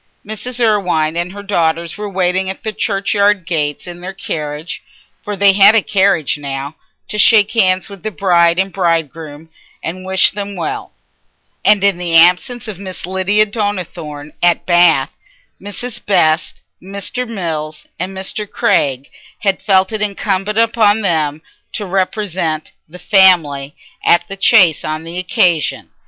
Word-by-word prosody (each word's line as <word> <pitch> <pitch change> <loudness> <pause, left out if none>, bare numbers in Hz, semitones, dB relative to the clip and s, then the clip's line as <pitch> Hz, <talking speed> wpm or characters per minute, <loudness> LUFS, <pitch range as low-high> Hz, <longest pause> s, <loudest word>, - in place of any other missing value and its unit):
Mrs. 220 +4 -5
Irwine 180 -9 +1
and 175 +1 -2
her 205 +1 -9
daughters 170 -4 -1
were 210 -1 -6
waiting 190 0 0
at 190 - -7
the 220 - -3
churchyard 200 -1 0
gates 150 -4 -2
in 175 -1 -9
their 190 +2 -6
carriage 150 -2 -5 0.4
(for 205 -1 -5
they 200 0 +4
had 200 +2 +6
a 225 - +4
carriage 190 -7 +1
now) 140 +1 -5 0.3
to 210 - -3
shake 210 +2 +5
hands 185 -5 +2
with 200 -3 -12
the 215 - -3
bride 175 -4 +2
and 190 0 -1
bridegroom 165 -3 -2 0.3
and 185 +3 -5
wish 190 0 +3
them 200 0 -6
well; 170 -4 -5 0.7
and 205 -2 +4
in 200 -3 +2
the 170 -2 -1
absence 180 +8 +3
of 205 -4 -7
Miss 185 -3 -6
Lydia 190 +3 +2
Donnithorne 180 -8 -5
at 175 -1 +2
Bath, 175 -6 +3 0.5
Mrs. 225 +4 -7
Best, 160 -5 +1 0.2
Mr. 200 +6 -5
Mills, 160 -7 -5
and 190 +2 -4
Mr. 195 +2 -3
Craig 135 -1 0 0.3
had 195 -3 0
felt 190 -1 +2
it 215 -1 -3
incumbent 210 +2 -1
on 210 0 +4
them 155 -4 0 0.3
to 210 - -3
represent 185 -4 -2 0.2
"the 175 - -11
family" 165 -8 +3 0.3
at 175 0 +3
the 195 - -7
Chase 190 -5 +4
on 155 +1 -4
the 170 +2 -5
occasion. 175 -3 0
185 Hz, 150 wpm, -16 LUFS, 165-205 Hz, 0.7 s, had